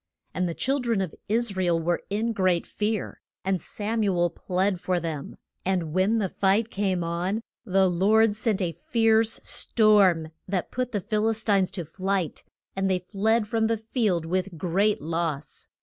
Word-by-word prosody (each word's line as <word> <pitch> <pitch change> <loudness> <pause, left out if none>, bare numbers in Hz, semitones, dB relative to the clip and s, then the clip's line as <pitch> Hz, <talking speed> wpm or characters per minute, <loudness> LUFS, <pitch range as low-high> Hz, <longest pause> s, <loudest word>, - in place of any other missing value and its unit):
And 180 -1 -1
the 165 - -4
chil 275 +2 0
dren 235 -5 0
of 185 -5 -2 0.2
Is 225 -1 +1
ra 190 - 0
el 170 -1 +2
were 170 +1 0
in 220 +3 -1
great 185 -4 +1
fear, 215 0 -3 0.2
and 190 -3 0
Sam 220 +5 -3
u 195 -4 +1
el 175 0 +2
plead 185 +2 -1
for 180 0 0
them, 160 -4 -5 0.3
and 180 -5 -1
when 190 +5 +2
the 205 -3 +1
fight 200 +5 +1
came 190 -3 0
on 180 +6 -2 0.2
the 190 0 +3
Lord 205 +5 +3
sent 215 -3 0
a 170 - -1
fierce 225 +3 +3
storm 195 -8 +3 0.2
that 185 -2 -2
put 250 0 -2
the 205 -3 -1
Phil 215 +3 0
is 220 0 0
tines 195 -4 +2
to 180 -4 -3
flight, 190 +1 -2 0.3
and 195 0 0
they 185 - +2
fled 210 +4 0
from 220 +1 +1
the 225 0 0
field 215 -6 -1
with 185 +1 -2
great 195 +3 +1
loss. 160 -3 -3
195 Hz, 180 wpm, -26 LUFS, 175-220 Hz, 0.3 s, the